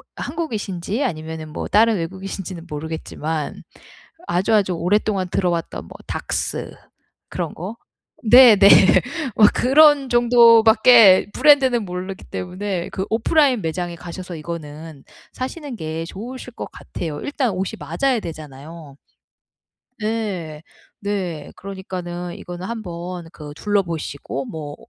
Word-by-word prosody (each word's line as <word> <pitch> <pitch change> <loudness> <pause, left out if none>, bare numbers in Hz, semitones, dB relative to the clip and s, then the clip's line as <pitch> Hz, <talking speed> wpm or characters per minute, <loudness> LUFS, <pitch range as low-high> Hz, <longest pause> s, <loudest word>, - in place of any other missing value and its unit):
한국이신지 225 - -3
아니면은 160 - -5
뭐 - - -5
다른 225 +1 +4
외국이신지는 185 0 -6
모르겠지만 160 0 -5 0.6
아주아주 190 +1 +1
오랫동안 190 +2 0
들어왔던 175 -3 -2
뭐 - - -13
Daks - - -3 0.5
그런 - - -4
거. 195 +8 -7 0.5
네. 240 0 +8
네. 200 0 +7 0.7
뭐 215 - +8
그런 285 +1 +5
정도 235 -1 +6
밖에 220 -4 +7
브랜드는 265 -5 +4
모르기 185 +1 -6
때문에 180 0 -4
그 190 - -3
오프라인 255 +2 +2
매장에 170 +1 -3
가셔서 180 +1 -8
이거는 155 -2 -8 0.3
사시는 265 0 -6
게 160 -1 -4
좋으실 245 +6 -8
것 - - -7
같아요. 155 -4 -6
일단 280 -4 -1
옷이 190 0 -3
맞아야 175 - 0
되잖아요. 155 -2 -10 1.0
네. 200 -9 -3 0.4
네. 185 -7 -4
그러니까는 180 -2 -6
이거는 175 +1 -8
한번 180 -5 -6
그 150 -3 -10
둘러보시고 165 - -2
뭐 145 0 -7
185 Hz, 280 characters per minute, -21 LUFS, 165-225 Hz, 1.0 s, 네